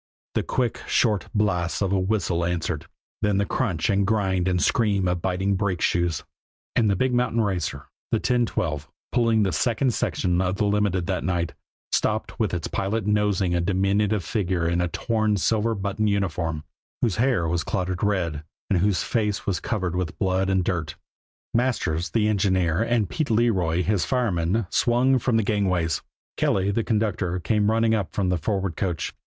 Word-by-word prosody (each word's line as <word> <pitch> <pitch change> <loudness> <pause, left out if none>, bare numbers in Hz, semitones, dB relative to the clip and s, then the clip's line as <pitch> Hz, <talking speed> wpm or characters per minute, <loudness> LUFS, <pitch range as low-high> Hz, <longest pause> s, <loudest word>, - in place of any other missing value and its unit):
The - - +1
quick, 125 -2 -1
short 105 -5 +2
blasts 90 -5 +1
of 100 -2 0
a 100 - +2
whistle 95 -3 0
answered, 85 -2 -2 0.3
then 105 -2 +2
the 100 - +2
crunch 90 -9 -1
and 100 0 +2
grind 95 -4 +1
and 90 -1 +1
scream 100 -3 +2
of 90 -1 -1
biting 95 +2 0
brake 95 -3 -1
shoes 85 -2 0 0.5
and 115 -3 +3
the 100 - +2
big 130 +6 +1
mountain 120 -1 +1
racer, 90 - -2 0.3
the - - +3
1012, 90 - -1 0.2
pulling 115 -3 +3
the 95 - +1
second 120 +3 +1
section 90 -4 0
of 95 0 0
the 105 - 0
Limited 100 -3 +1
that 95 0 -2
night, 85 -2 -1 0.4
stopped 110 +1 -1
with 110 -3 +1
its 85 -3 -2
pilot 100 +2 -2
nosing 105 -3 +1
a 85 - +1
diminutive 100 +2 +1
figure 90 -2 -1
in 85 +1 +1
a 90 - +1
torn 110 +5 -1
and 100 - 0
silver 110 +3 +1
buttoned 100 +2 -1
uniform, 85 -6 -1 0.4
whose 115 -6 +1
hair 115 -8 +2
was 85 0 0
clotted 95 -1 -2
red, 85 -7 0 0.3
and 95 - +3
whose 100 +1 +1
face 105 -3 -1
was 95 -3 0
covered 95 -6 -2
with 90 -3 -3
blood 95 0 +1
and 95 -1 +2
dirt. 80 -3 -2 0.6
Masters, 95 -9 0
the 110 -2 +1
engineer, 95 -4 +1
and 115 -3 +1
Pete 150 - -2
Leroy, 95 -7 +2
his 100 0 +1
fireman, 105 -5 0
swung 125 +2 +3
from 120 -1 +1
the 110 - +2
gangways; 90 -6 0 0.4
Kelly, 95 +1 +1
the 115 +3 0
conductor, 105 -5 0
came 105 +4 +1
running 115 0 +2
up 105 -5 -1
from 95 -3 0
the 90 -2 +1
forward 95 0 -1
coach. 90 -5 -2
95 Hz, 175 wpm, -24 LUFS, 90-110 Hz, 0.6 s, and